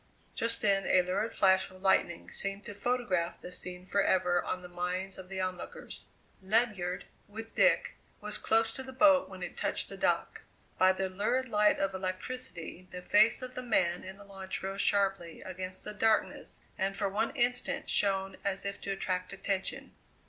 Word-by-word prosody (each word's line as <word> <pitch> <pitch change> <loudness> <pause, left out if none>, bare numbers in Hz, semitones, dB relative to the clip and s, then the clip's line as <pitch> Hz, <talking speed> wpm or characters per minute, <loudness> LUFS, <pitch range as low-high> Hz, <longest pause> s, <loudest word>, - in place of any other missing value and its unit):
Just 230 0 0
then 195 -2 +3
a 185 - +5
lurid 200 +5 -1
flash 190 -1 +4
of 185 +1 -16
lightning 175 -3 +2
seemed 195 +1 -1
to 210 - -6
photograph 205 -6 -1
the 180 - -9
scene 180 0 -5
forever 185 -2 +2
on 185 - -3
the - - -7
minds 180 +2 -3
of 185 -1 -10
the 190 -1 -4
onlookers. 185 -1 -5 0.4
Ledyard, 195 -3 0 0.2
with 225 +2 -9
Dick, - - +3 0.3
was 210 0 -1
close 225 0 +2
to - - -5
the 260 0 -9
boat 285 +1 +5
when - - -8
it - - -6
touched - - 0
the - - -7
dock. - - 0 0.4
By 185 0 +6
the 190 0 -1
lurid 215 +7 -1
light 210 -1 +4
of 195 0 0
electricity 185 -1 -5
the 180 0 -8
face 220 +7 +4
of 255 0 -6
the 255 - -4
man 180 -8 +1
in 190 +1 -9
the 205 - -13
launch 195 -1 -6
rose 195 +1 -2
sharply 195 -5 +1
against 185 0 -5
the 210 - -6
darkness 220 +1 0 0.2
and 195 +1 0
for 200 -1 +1
one 210 +4 0
instant 245 -1 +1
shone 195 -1 +1
as 195 0 -2
if 200 0 -4
to - - -6
attract 185 -1 -2
attention. 195 -1 -3
195 Hz, 180 wpm, -31 LUFS, 185-215 Hz, 0.4 s, By